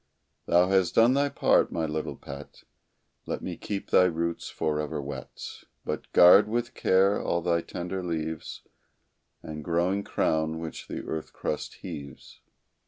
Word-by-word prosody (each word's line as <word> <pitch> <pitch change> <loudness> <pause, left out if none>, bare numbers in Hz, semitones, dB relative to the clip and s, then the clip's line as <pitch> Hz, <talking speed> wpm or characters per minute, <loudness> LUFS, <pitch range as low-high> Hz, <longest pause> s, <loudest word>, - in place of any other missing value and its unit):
Thou 90 +1 +4
hast 95 -2 +2
done 115 +3 +6
thy 140 +1 +2
part, - - +3
my 80 - -1
little 80 0 -3
pet 70 +1 -10 0.6
Let - - -3
me - - -4
keep 100 -2 -5
thy 90 - +6
roots 85 -1 -2
forever 75 0 -2
wet, 70 -2 -7 0.2
But - - -4
guard 90 +4 +8
with 120 +2 -2
care 95 -1 +3
all 85 0 -1
thy 85 -1 +2
tender 90 +3 -5
leaves 80 -2 -4 0.8
And 75 -1 -7
growing 90 +5 +1
crown, 80 -3 0
which 80 -1 -7
the - - -5
earth 80 -1 -5
crust 75 - -4
heaves. 70 -2 -9
85 Hz, 145 wpm, -27 LUFS, 80-95 Hz, 0.8 s, guard